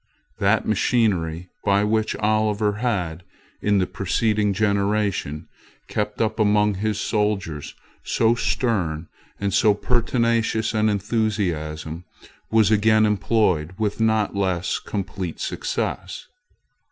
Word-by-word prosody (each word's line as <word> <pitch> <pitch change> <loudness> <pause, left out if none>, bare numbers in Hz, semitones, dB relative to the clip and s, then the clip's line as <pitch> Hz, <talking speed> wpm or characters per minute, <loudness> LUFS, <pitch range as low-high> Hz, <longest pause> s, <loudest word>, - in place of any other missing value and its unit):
That 100 +2 +2
machinery, 90 -6 +1
by 100 0 +3
which 110 0 0
Oliver 105 -1 +1
had, 90 -9 -2 0.4
in 105 -1 +2
the 95 - +2
preceding 105 +2 0
generation, 100 -6 0 0.4
kept 105 0 -3
up 110 0 0
among 105 0 +3
his 105 +1 -2
soldiers 100 -9 -2 0.3
so 115 0 +2
stern 90 -10 -1 0.3
and 100 0 -1
so 105 -3 +4
pertinacious 115 -1 +1
an 110 0 +2
enthusiasm, 90 -7 -2 0.4
was 110 -2 +4
again 110 0 +4
employed 95 -6 +1
with 105 -1 -1
not 110 -2 +2
less 95 -3 0
complete 95 -4 -5
success. 95 +1 -3
105 Hz, 105 wpm, -23 LUFS, 95-110 Hz, 0.4 s, so